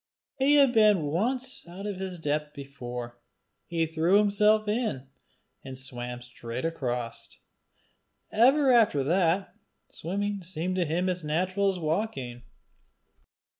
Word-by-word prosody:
He 280 +2 +4
had 275 -4 +5
been 210 -6 +5
once 245 - -1
out 185 +4 -8
of 205 -2 -3
his 190 -1 -5
depth 150 -1 -2
before: 125 -4 -7 0.5
he 165 -1 0
threw 165 +4 +2
himself 210 +1 +3
in, 210 - -1 0.6
and 130 -1 -8
swam 125 -2 -6
straight 125 +1 -6
across: 125 -7 -3 1.0
ever 265 +5 +5
after 215 - +4
that, 175 +4 +1 0.4
swimming 200 +4 -3
seemed 180 +1 -3
to 180 - +2
him 170 +4 0
as 180 -2 -1
natural 185 +6 +1
as 190 - -2
walking. 155 - -2
175 Hz, 125 wpm, -28 LUFS, 140-205 Hz, 1.0 s, had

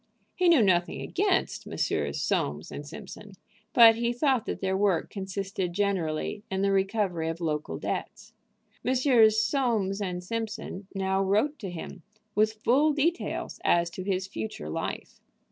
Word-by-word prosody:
He 360 -1 +3
knew 310 -9 +6
nothing 175 -3 +2
against - - 0
Messrs. - - -1
Soames 75 +3 -1
& - - -7
Simpson, 205 +5 -10 0.4
but 230 -2 +8
he 235 0 0
thought 250 -1 +1
that - - -3
their 190 0 0
work 190 -4 +1
consisted 190 -2 -4
generally 195 -1 -1
in 190 0 -1
the 200 - +2
recovery 195 -4 0
of 165 +1 -4
local 155 -3 -2
debts. - - -5 0.5
Messrs. 245 -4 +4
Soames 215 -4 0 0.2
& - - -6
Simpson 220 -3 -4
now 190 0 0
wrote 215 +10 +1
to 195 - -5
him 175 +1 -8 0.3
with 215 +1 +1
full 290 +6 +4
details 325 +4 -1
as 170 0 +2
to 185 - -6
his 185 0 -1
future 110 - -6
life. - - -5
195 Hz, 145 wpm, -28 LUFS, 185-230 Hz, 0.5 s, but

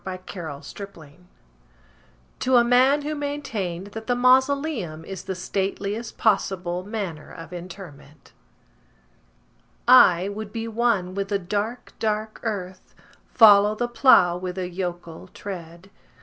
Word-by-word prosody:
The 185 -1 -6
Traveller 160 -6 -7 0.4
heart 145 - -16 1.3
(To 260 0 +2
a 240 - +7
Man 260 +4 +4
who 305 +1 -3
maintained 230 - -4
that 220 0 -8
the 245 - +1
Mausoleum 255 - +2
is 195 -2 -8
the 190 - -4
Stateliest 200 +4 -3
Possible 185 -4 0
Manner 195 -7 -6
of 165 +1 -10
Interment) 175 -5 -11 1.5
I 190 -8 +7
would 205 +1 -6
be 225 0 -4
one 225 -5 0
with 200 0 -3
the 200 0 0
dark, 205 +6 -4
dark 215 0 -2
earth:— 190 -5 -6 0.3
Follow 210 -2 +6
the 240 +2 -1
plough 210 -8 +5
with 180 0 -6
a 185 -1 -2
yokel 175 -1 -6
tread. 175 -1 -9
200 Hz, 125 wpm, -24 LUFS, 180-235 Hz, 1.5 s, a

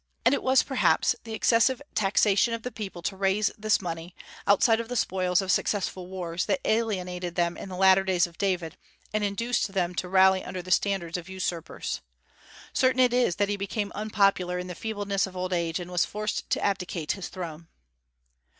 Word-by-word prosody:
And 245 - +5
it - - +1
was 260 0 +4
perhaps 265 -2 +2
the 225 -1 -5
excessive 235 +3 +3
taxation 205 +3 +3
of 230 - -9
the 250 - -4
people 195 -6 -7
to 195 - -2
raise 195 +2 +1
this 215 0 +2
money, 170 -1 -6 0.3
outside 225 +3 +4
of 230 0 -5
the 245 - -3
spoils 185 -3 +1
of 190 - 0
successful 185 -3 -1
wars, 180 -2 -3
that 280 - +1
alienated 180 -6 -1
them 170 0 +1
in - - -8
the 185 - -6
latter 190 0 +5
days 185 -2 +2
of 170 -1 -13
David, 180 -5 -1 0.4
and 215 0 0
induced 205 +1 -1
them 180 -2 0
to 180 +1 -3
rally 190 0 +5
under 185 -1 -6
the 185 - -8
standards 185 -3 +1
of 175 +1 -9
usurpers. 180 -3 -4 0.7
Certain 255 -1 +2
it 250 -1 +5
is 245 -8 +2
that 205 -1 +1
he 205 - -1
became 200 +1 -3
unpopular 195 -4 +1
in 180 - -4
the 180 - -6
feebleness 205 0 -2
of 185 -1 -10
old 185 0 -2
age, 170 -1 -1
and 175 0 -7
was 175 -1 +2
forced 210 +1 -3
to - - 0
abdicate 180 -5 -1
his 195 - -4
throne. 170 -3 -7
190 Hz, 195 wpm, -27 LUFS, 180-215 Hz, 0.7 s, And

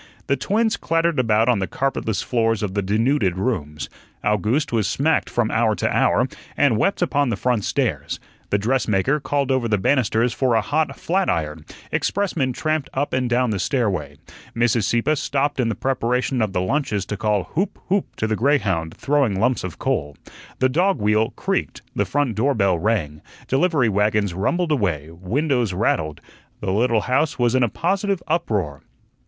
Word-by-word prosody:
The 140 - +1
twins 220 - 0
clattered 165 -2 +1
about 115 -2 +3
on 120 -5 +3
the 95 - -1
carpetless 130 -6 -1
floors 115 -3 0
of 100 -2 -2
the 100 - 0
denuded 105 -1 +1
rooms. 85 - -2 0.4
Owgooste 105 - +1
was 110 -4 +1
smacked 160 +4 +1
from 120 -2 0
hour 110 -1 +2
to - - -1
hour, - - +3 0.3
and 140 -5 +4
wept 195 - +1
upon 145 -5 +1
the 115 - 0
front 120 -1 0
stairs; - - -1 0.3
the 100 - +2
dressmaker 120 +3 +1
called 140 -1 -1
over 130 -3 +1
the 105 -2 +2
banisters 120 +1 +2
for 130 -3 +1
a 110 - +3
hot 155 +7 -1
flatiron; 80 - -1 0.3
expressmen 175 -10 0
tramped 155 +2 -1
up 140 +2 -1
and 130 -1 0
down 120 0 +2
the 100 - -1
stairway. 90 - -1 0.4
Mrs. 115 -2 +2
Sieppe 120 +10 +1
stopped 145 0 -1
in 120 -2 +2
the 110 - -1
preparation 125 -1 0
of 110 -3 0
the 90 - 0
lunches 105 -2 -1
to 105 - -4
call 105 -1 0
"Hoop, 185 +5 -1
Hoop" 195 +1 0
to - - -2
the 110 0 0
greyhound, 105 - +1
throwing 135 -9 +1
lumps 125 +4 +1
of 95 -4 -6
coal. 70 0 -2 0.4
The 130 - +3
dog 175 +7 +2
wheel 105 +1 +2
creaked, - - -2
the - - +1
front 145 -5 0
door 135 +7 +1
bell 100 -5 +2
rang, 80 -7 -1 0.3
delivery 145 -2 +2
wagons 105 -2 +1
rumbled 160 - 0
away, 85 - 0
windows 120 - -1
rattled 80 -6 -1 0.4
the 95 - -2
little 115 +1 +2
house 145 +7 0
was 120 -1 +2
in 130 - +3
a 120 - +3
positive 195 - -1
uproar. 105 - -1
120 Hz, 175 wpm, -22 LUFS, 100-140 Hz, 0.4 s, and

